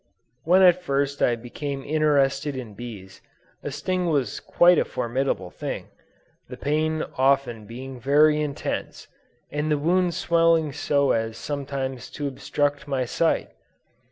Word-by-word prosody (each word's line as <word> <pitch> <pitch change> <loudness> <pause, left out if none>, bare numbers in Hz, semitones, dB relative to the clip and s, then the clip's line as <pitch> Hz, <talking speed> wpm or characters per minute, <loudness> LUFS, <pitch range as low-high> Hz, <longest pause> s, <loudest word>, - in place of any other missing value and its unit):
When 185 +4 +5
I 180 - +9
first 140 -5 -2 0.2
became 140 +2 -5
interested 145 -2 +1
in 120 -5 -7
bees, 100 -4 -9 0.4
a - - -4
sting 185 -1 -2
was 140 -8 0
quite 175 -1 +4
a - - +3
formidable 120 -6 -2
thing, - - -5 0.6
the 125 - -8
pain 155 +3 0 0.2
often 130 -5 +2
being 130 +3 -8
very 150 +4 +4
intense, 145 -2 -4 0.4
and 150 +1 -2
the 150 - +2
wound 175 +3 +1
swelling 165 -4 +3
so 140 -1 +1
as 115 0 -1
sometimes 135 -2 -4
to 145 -2 -2
obstruct 145 +2 -2
my 135 -3 -1
sight. 165 +7 0
140 Hz, 130 wpm, -24 LUFS, 130-155 Hz, 0.6 s, I